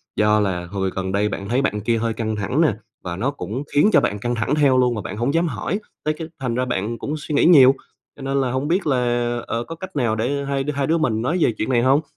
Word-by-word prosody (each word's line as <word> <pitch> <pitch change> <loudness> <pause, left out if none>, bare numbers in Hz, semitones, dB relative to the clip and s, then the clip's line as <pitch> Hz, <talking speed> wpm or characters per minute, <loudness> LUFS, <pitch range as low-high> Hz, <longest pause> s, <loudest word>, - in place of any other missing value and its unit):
do 105 0 +3
là 95 -4 -1
hồi 95 +1 -2
gần 95 0 -2
đây 100 +2 +1
bạn 100 -1 -5
thấy 125 +3 +2
bạn 105 -6 -1
kia 115 +2 +1
hơi 115 0 -1
căng 110 -1 -2
thẳng 105 +9 0
nè, 155 -8 +3 0.3
và 85 -2 -4
nó 125 +10 -1
cũng 130 -2 -5
khiến 145 +8 +5
cho - - +6
bạn 105 - -1
căng 120 +3 -2
thẳng 115 +5 0
theo 140 -4 +4
luôn 125 -1 +3
mà 105 - -3
bạn 100 - -6
hổng 120 +5 0
dám 165 +1 +2
hỏi, 155 - -2 0.2
tới 155 - +1
cái 160 - -5
thành 125 -3 -2
ra 125 +1 0
bạn 115 -1 -2
cũng 150 - -3
suy 150 0 -4
nghĩ - - +4
nhiều, 135 -6 +7 0.4
cho - - -13
nên 135 +1 0
là 130 -2 -1
hổng 130 +3 -1
biết 175 +2 0
là, 135 -3 +2 0.5
ờ, 115 +1 -2
có 165 - -8
cách 190 +2 -9
nào 120 -6 +1
để 140 +6 -1
hai 140 -1 -1
hai 140 -1 0
đứa 165 - +2
mình 120 -9 0
nói 130 +9 0
về 120 - +3
chuyện 110 - -2
này 120 -2 +3
hông. 135 +3 +4
125 Hz, 280 wpm, -21 LUFS, 110-140 Hz, 0.5 s, nhiều